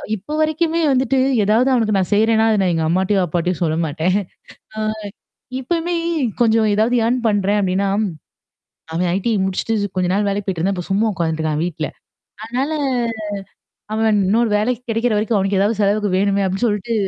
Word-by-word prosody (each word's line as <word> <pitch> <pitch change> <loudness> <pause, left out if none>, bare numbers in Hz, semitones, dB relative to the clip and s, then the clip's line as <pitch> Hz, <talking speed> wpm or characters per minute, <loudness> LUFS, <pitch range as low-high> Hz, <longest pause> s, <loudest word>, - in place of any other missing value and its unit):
இப்ப 210 +9 -11
வரைக்குமே 315 +2 +1
வந்துட்டு 265 0 +1 0.3
ஏதாவது 225 +6 +3
அவனக்கு 220 -4 +2
நான் 190 0 -1
செய்றேன்னா, 220 +1 +3
அத 215 - +2
நான் 185 -2 +2
எங்க 160 - 0
அம்மாட்டயோ, 190 +3 +1
அப்பாட்டயும் 175 +2 -2
சொல்ல 160 -2 0
மாட்டேன். 160 +5 0 0.6
ஆ. - - -3 0.8
இப்பயுமே 335 +6 -1 0.5
கொஞ்சம் 225 -2 +3
ஏதாவது 220 +4 +2
ஏர்ன் 245 +2 +1
பண்றேன் 205 -1 +2
அப்டின்னா, 190 +1 0 1.1
அவன் 175 +1 0
ஐடிஐ 220 +3 0
முடிச்சுட்டு 190 +4 -1 0.2
கொஞ்ச 180 -1 +1
நாள் 205 +1 +1
வேலைக்கு 200 0 -2
போயிட்டுருந்தான், 190 +1 0
இப்போ 180 - -5
சும்மா 210 +3 +2
உட்காந்துட்டுருக்கான் 160 -3 -1
வீட்ல. 160 -3 -3 0.6
அதனால. 260 +7 -2 1.2
அவன் 220 -1 +2
இன்னொரு 225 +4 +2
வேலைக்கு 240 +3 -1
கிடைக்கிற 225 +1 +1
வரைக்கும் 215 +1 +1
அவனக்கு 195 0 0
ஏதாவது 210 +1 +1
செலவுக்கு 205 +1 +2
வேணுமே 200 0 +1
அப்டின்னு 195 +6 0
சொல்லிட்டு, 210 +1 -1
205 Hz, 155 wpm, -19 LUFS, 185-230 Hz, 1.2 s, ஏதாவது